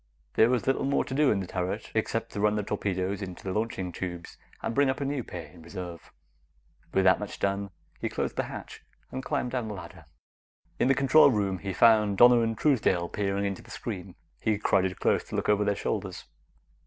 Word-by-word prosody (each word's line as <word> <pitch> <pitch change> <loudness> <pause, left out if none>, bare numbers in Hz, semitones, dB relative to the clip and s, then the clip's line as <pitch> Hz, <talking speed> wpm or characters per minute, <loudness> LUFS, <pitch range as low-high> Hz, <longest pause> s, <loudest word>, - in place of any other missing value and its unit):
There 110 - +5
was 125 -3 +1
little 135 +1 +1
more 140 +1 +1
to - - -6
do 145 0 +4
in 100 - +2
the - - -4
turret, 90 +1 -3
except - - -1
to 100 - -5
run 105 0 +3
the 105 - -1
torpedoes 100 -1 -2
into 90 -3 -7
the 95 - -3
launching 105 -4 -2
tubes 85 -1 -6 0.3
and - - -1
bring 140 +2 +3
up 130 - -1
a 140 - -2
new 140 -2 -2
pair 85 -5 -7
in 85 - -15
reserve. 85 0 -8 0.8
With 95 - +2
that 95 0 +5
much 105 - -6
done, 100 0 -1 0.3
he - - -2
closed - - -3
the - - -1
hatch - - -8 0.3
and 130 - -5
climbed 140 -4 -1
down 125 -3 -2
the 105 - -5
ladder. 90 -4 -10 0.7
In - - +3
the 135 - +4
control 135 +3 +6
room, 100 -6 0
he 100 - -4
found 105 0 +4
Donna 120 +1 +8
and 115 -1 -1
Truesdale 100 - +2
peering 100 -1 -1
into 100 -1 -3
the - - -17
screen. - - -6 0.2
He 110 -1 +1
crowded 95 -2 +1
close - - +2
to - - -7
look - - -1
over 105 0 +4
their 100 0 +1
shoulders. - - -3
100 Hz, 215 wpm, -28 LUFS, 95-120 Hz, 0.8 s, Donna